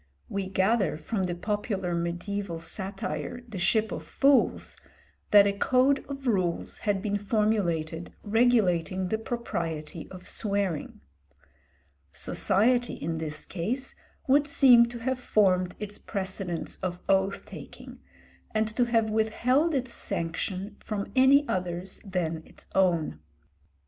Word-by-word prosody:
We 195 -1 -2
gather 190 -2 +1
from 190 +5 -2
the 175 - -2
popular 200 -1 -2
mediæval 175 +1 -3
satire, 190 +3 -4
the 215 -5 -6
'Ship 220 +3 +2
of 155 - -4
Fools,' 275 - +2 0.5
that 205 -1 +8
a 200 - +2
code 260 +6 +3
of 275 -1 -6
rules 185 -8 0
had 200 -1 +1
been 205 -1 0
formulated 190 -7 0
regulating 200 -5 +2
the 220 - 0
propriety 170 -10 -4
of 185 -1 -11
swearing. 200 -7 -2 1.1
Society 230 - +2
in 165 +1 -3
this 155 -1 -5
case 235 +10 -3 0.3
would 285 +2 +4
seem 250 -4 +7
to 240 0 -7
have 255 +2 -2
formed 185 -6 +2
its 210 -1 -6
precedents 190 -4 -4
of 180 -1 -4
oath 195 0 +1
taking, - - -11 0.6
and 215 0 +2
to 245 - +3
have 225 -2 +1
withheld 250 +8 +2
its 255 -2 -2
sanction 185 +4 -3
from 205 -2 -4
any 275 +2 +6
others 180 0 -3
than 175 -5 -2
its - - -15
own. 170 - +2
200 Hz, 125 wpm, -28 LUFS, 175-230 Hz, 1.1 s, that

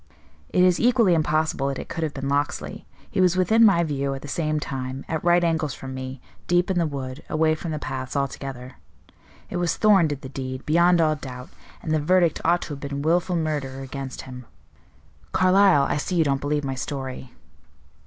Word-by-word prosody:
"It 180 - +3
is 180 -1 +4
equally 235 -6 +4
impossible 155 -3 +1
that 135 -1 -2
it - - -7
could 165 - -5
have 155 -2 -3
been 135 0 -4
Locksley. 145 +1 -2 0.2
He - - +1
was 185 0 +3
within 220 +5 +4
my 195 -6 +5
view 140 -3 -2
at 135 - -9
the - - -7
same 155 +1 -1
time, 130 -2 -5
at 160 -1 -3
right 175 0 +4
angles 160 -5 0
from 130 0 -8
me, 130 0 -6 0.3
deep 175 +1 +2
in 180 - +1
the 165 - +1
wood, 135 -2 -6
away 155 0 +2
from 160 +2 -5
the 155 - -2
paths 130 -2 -5
altogether. 135 -2 -4 0.7
It - - -2
was 175 -1 0
Thorn 200 -6 +5
did 145 -2 -4
the 130 - -8
deed, 130 -1 -6
beyond 170 +2 +4
all 155 -1 +3
doubt, 125 -3 -9 0.3
and 155 - -3
the 155 - +2
verdict 175 +1 +2
ought 175 +2 +2
to - - -8
have 145 -2 -6
been 140 0 -4
willful 175 +3 +1
murder 145 -5 -2
against 135 0 -6
him. 125 -2 -10 0.9
Carlyle, 185 -4 +5
I 140 - 0
see 180 +5 -3
you 165 - +4
don't 140 -2 0
believe 145 +1 -1
my 135 -1 -2
story." 130 -1 -5
150 Hz, 205 wpm, -24 LUFS, 135-170 Hz, 0.9 s, my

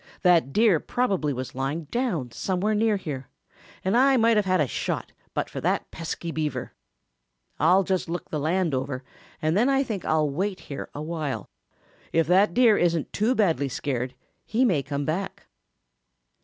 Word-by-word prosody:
That 170 -6 +4
Deer 210 -2 +4
probably 195 -11 0
was 130 -1 -5
lying 135 +5 -2
down 170 - -2
somewhere 190 - -1
near 215 0 +2
here, 140 -8 -6 0.6
and 190 - +2
I 265 +2 +5
might 230 -1 +4
have 210 -2 +2
had 185 0 +3
a 150 - +4
shot - - -3 0.2
but - - 0
for - - -6
that - - 0
pesky 165 +1 -5
Beaver. 150 -6 -3 0.9
I'll 180 +5 +5
just 185 -2 -1
look 175 0 -5
the 155 - -1
land 165 +2 +1
over, 130 0 -2 0.4
and 155 +2 +2
then 235 +7 +3
I 270 0 +3
think 215 -8 -4
I'll 155 -1 +2
wait 185 +7 -2
here 140 - -7
awhile. 155 -1 -4 0.6
If 165 0 +3
that 185 +3 +4
Deer 235 -4 +5
isn't 170 -2 +1
too 225 +5 +2
badly 160 - +2
scared, 130 -1 -3 0.3
he 240 +4 +1
may 175 - +2
come 140 +1 -3
back." 190 +6 -3
170 Hz, 170 wpm, -25 LUFS, 145-205 Hz, 0.9 s, I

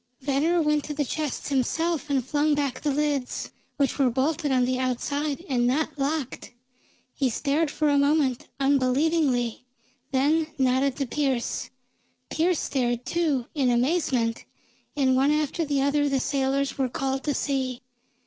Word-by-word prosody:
Venner 300 +5 +1
went 300 -1 +1
to 300 - -5
the 290 0 0
chests 300 +1 -3
himself 300 +3 0
and 270 -4 +1
flung 295 +2 +2
back 280 -3 -2
the 300 - 0
lids, 285 -2 -1 0.3
which 280 0 0
were 265 -2 +4
bolted 280 +4 0
on 255 -1 +3
the 255 0 -1
outside 285 +5 -2
and 245 -4 +1
not 290 +5 0
locked. 275 -3 -3 0.6
He 270 -3 0
stared 290 +6 0
for 305 +1 0
a 285 -1 +4
moment, 280 -3 +1
unbelievingly, 270 -2 +1 0.5
then 300 +4 +2
nodded 260 0 +2
to 275 - -2
Pearse. 265 -2 -1 0.6
Pearse 340 +1 +1
stared, 245 -2 -1
too, 305 -8 0
in 270 -5 +1
amazement, 245 -3 +1 0.5
and 260 -2 +3
one 270 +2 +3
after 300 +2 0
the 280 -2 0
other 290 +1 +2
the 275 -1 +1
sailors 275 0 -1
were 260 -1 +1
called 270 +2 -2
to 290 -2 0
see. 260 -3 -2
275 Hz, 150 wpm, -25 LUFS, 260-300 Hz, 0.6 s, were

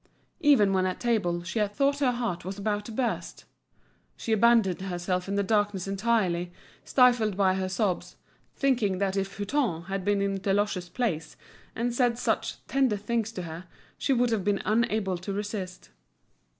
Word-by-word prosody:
Even 240 -10 +5
when 185 -1 +2
at 185 - -3
table, 200 -8 0
she 185 +5 -3
had 205 -1 -1
thought 280 +2 +2
her 265 -3 +3
heart 235 -8 -3
was 190 +2 -5
about 205 0 -1
to 230 - -7
burst. 240 +1 -3 0.7
She 230 - -4
abandoned 220 -4 +4
herself 180 0 -2
in 200 - -2
the 200 - +2
darkness 205 -2 0
entirely, 195 -4 0 0.3
stifled 240 -6 +3
by 190 -2 +4
her 190 0 -2
sobs, 190 -1 -1 0.4
thinking 235 -9 +1
that 195 0 0
if 195 0 -2
Hutin 205 - -1
had 195 +1 -4
been 205 +1 +2
in 200 0 0
Deloche's 195 -2 0
place 180 -11 -2 0.4
and 240 +1 -1
said 240 -1 +2
such - - -2
tender 265 -6 +1
things 225 +2 -2
to 180 - -5
her, 165 +2 -7 0.3
she - - -1
would 245 -2 +3
have 215 -4 0
been 200 0 0
unable 215 -3 +1
to 185 +3 -5
resist. 195 -2 -5
205 Hz, 170 wpm, -27 LUFS, 185-235 Hz, 0.7 s, Even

